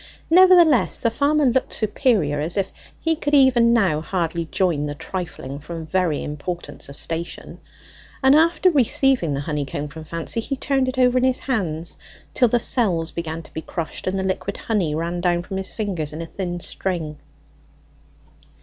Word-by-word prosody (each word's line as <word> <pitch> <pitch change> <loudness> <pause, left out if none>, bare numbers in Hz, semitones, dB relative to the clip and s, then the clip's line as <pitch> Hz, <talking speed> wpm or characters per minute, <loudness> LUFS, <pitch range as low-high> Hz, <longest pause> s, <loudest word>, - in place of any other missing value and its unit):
Nevertheless 350 -6 +6
the 230 - +1
farmer 290 +4 +2
looked 255 0 +1
superior, 210 - +1
as 165 +6 -1
if 195 -1 0 0.3
he 325 0 0
could 295 -1 0
even 250 -4 +5
now 190 -10 +2
hardly 170 -1 -2
join 160 -4 0
the 145 - -5
trifling 155 -6 -6
from 165 +2 -7
very 165 -2 0
importance 160 +2 -6
of 140 - -8
station; 165 +3 -5 0.6
and 265 +1 +6
after 335 +3 +4
receiving 260 - +2
the 140 - -3
honeycomb 145 -1 -3
from 160 +1 -9
Fancy, 165 +7 -3
he 275 +5 -3
turned 270 -1 0
it 255 0 -3
over 250 0 +4
in - - -1
his 260 -1 +1
hand 175 - -2 0.4
till 250 - +4
the 240 +1 +2
cells 180 -10 +2
began 165 -1 -5
to - - -17
be 160 - -4
crushed, 165 +1 -6
and 185 +1 0
the 190 - -1
liquid 190 +1 -2
honey 185 -9 -1
ran 170 +2 -2
down 175 -1 +1
from 190 +2 -5
his 190 0 -4
fingers 175 -9 -3
in 155 - -5
a - - -6
thin 175 0 -5
string. 165 -4 -4
185 Hz, 175 wpm, -22 LUFS, 160-250 Hz, 0.6 s, Nevertheless